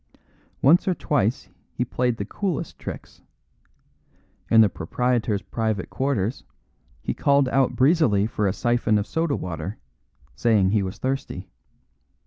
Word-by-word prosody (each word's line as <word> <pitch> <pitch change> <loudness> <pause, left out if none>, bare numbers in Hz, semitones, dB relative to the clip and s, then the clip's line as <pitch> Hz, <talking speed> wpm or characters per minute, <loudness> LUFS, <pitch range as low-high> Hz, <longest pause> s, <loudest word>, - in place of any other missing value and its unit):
Once 165 +9 +5
or 185 - +2
twice 125 -7 0 0.3
he 125 - 0
played 125 -1 -1
the 100 - -3
coolest 185 - -3
tricks. - - -8 1.3
In 115 - +7
the 110 - +6
proprietor's 110 +3 -1
private 110 -4 -2
quarters 130 -5 -1 0.6
he - - -1
called 140 -1 +3
out 135 -1 +2
breezily 130 - +3
for 105 -2 -1
a - - +2
syphon 120 -2 +1
of 105 - -1
soda 160 0 -1
water, 90 +3 -5 0.6
saying 100 - +2
he 105 -1 +2
was 95 0 -4
thirsty. 130 -8 -4
115 Hz, 130 wpm, -24 LUFS, 100-135 Hz, 1.3 s, In